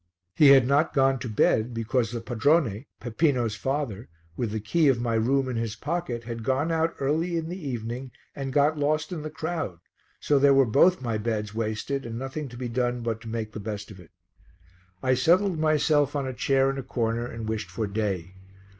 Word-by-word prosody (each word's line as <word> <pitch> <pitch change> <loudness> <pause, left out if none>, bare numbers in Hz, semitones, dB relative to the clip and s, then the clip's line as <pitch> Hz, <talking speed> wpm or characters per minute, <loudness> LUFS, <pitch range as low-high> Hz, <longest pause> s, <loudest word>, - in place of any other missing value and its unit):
He 150 - +6
had 135 -2 +8
not 145 +5 +2
gone 135 -1 +3
to 120 - -5
bed 110 +2 +2
because 115 0 0
the 120 -1 -4
padrone, 125 -1 +1
Peppino's 120 -2 0
father, 125 -3 -3 0.3
with 120 +3 -2
the 110 +1 -3
key 145 +10 +2
of 130 -3 +3
my 120 -1 -1
room 130 +4 +2
in 125 -2 -3
his 115 -1 -2
pocket, 145 -3 -3
had 115 0 -6
gone 135 +7 0
out 165 0 0
early 160 +5 0
in 165 0 -3
the 175 -4 -6
evening 120 +2 -5 0.3
and 135 -1 -4
got 150 +2 +2
lost 155 +4 0
in 170 -4 -4
the 155 - -5
crowd, 160 - -4 0.4
so 145 -2 +2
there 140 0 +5
were 135 -1 +5
both 140 +8 +4
my 115 -3 -1
beds 105 -1 -2
wasted 115 +5 -2
and 115 -1 -6
nothing 135 +3 -5
to 120 - -11
be 125 0 -4
done 120 0 -1
but 115 -1 -3
to 115 - -10
make 110 -1 -4
the 110 - -7
best 105 0 -6
of 100 - -12
it. 85 -3 -15 0.9
I 130 - +3
settled 175 +7 +3
myself 150 -2 +2
on 140 -2 -1
a 130 - -4
chair 135 +1 +2
in 135 - -5
a - - -2
corner 120 -1 -2
and 115 -2 -6
wished 110 -1 -3
for 110 - -3
day. 100 -4 -3
130 Hz, 205 wpm, -26 LUFS, 115-145 Hz, 0.9 s, had